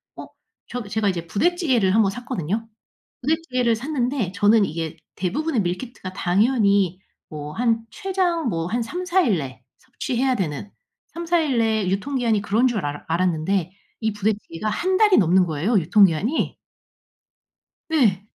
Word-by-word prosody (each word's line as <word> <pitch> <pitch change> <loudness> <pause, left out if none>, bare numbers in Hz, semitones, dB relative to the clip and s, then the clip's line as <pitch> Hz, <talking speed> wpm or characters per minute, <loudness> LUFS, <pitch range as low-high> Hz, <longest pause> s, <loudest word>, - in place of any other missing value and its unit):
어. - - -9 0.4
저 245 -1 -5
제가 205 0 0
이제 170 -3 -3
부대찌개를 250 - +2
1 225 - +5
번 195 - +1
샀거든요. 225 - -3 0.5
부대찌개를 255 -5 +1
샀는데 250 - -2
저는 205 +2 +4
이게 160 -1 -4 0.2
대부분의 275 - -1
밀키트가 185 +1 -5
당연히 200 -1 +2 0.3
뭐 150 -1 -7
한 230 +1 +1
최장 370 -6 -1
뭐 165 -4 -2
한 235 +5 -1
3-4 360 +8 0
일 220 - +2
내 130 -3 -7 0.2
섭취해야 255 +1 -1
되는, 185 -2 -3 0.4
3-4 340 +1 0
일 290 -6 0
내에 220 -4 +1
유통기한이 225 +1 0
그런 220 +5 +2
줄 225 -9 -1
알았 145 0 -4
알았는데 175 +1 0 0.3
이 220 -1 0
부대찌개가 210 -2 -2
1 370 - 0
달이 420 -2 +5
넘는 180 0 +4
거예요, 170 +8 +1
유통기한이. 190 - +2 1.3
네. 215 - +2
220 Hz, 290 characters per minute, -23 LUFS, 185-260 Hz, 1.3 s, 1